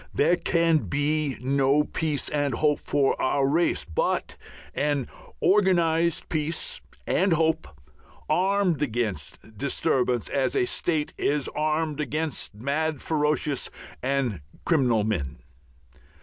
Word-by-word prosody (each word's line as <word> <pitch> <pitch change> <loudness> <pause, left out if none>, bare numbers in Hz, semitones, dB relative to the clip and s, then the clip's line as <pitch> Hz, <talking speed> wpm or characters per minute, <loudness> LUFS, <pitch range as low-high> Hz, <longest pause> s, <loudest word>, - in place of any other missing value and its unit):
There 165 +5 +4
can 170 -2 +2
be 145 -1 0
no 140 +2 +3
peace 150 -2 -2
and 145 -4 0
hope 150 +1 +2
for 140 -2 +1
our 135 +1 +2
race 165 +5 +1
but 80 - -1 0.4
an 145 -3 0 0.3
organized 170 -3 +3
peace 165 - -2 0.2
and 190 0 +2
hope, 160 0 +1 0.6
armed 185 -1 +2
against 110 - -2
disturbance 125 -3 +1
as 135 -2 0
a - - +3
state 155 +2 -1
is 145 -1 +1
armed 155 0 -1
against 150 -5 -2
mad, 145 +6 -1
ferocious, 150 -2 0 0.3
and 130 - -1 0.2
criminal 125 -10 +3
men. 95 -11 -2
150 Hz, 110 wpm, -26 LUFS, 135-160 Hz, 0.6 s, There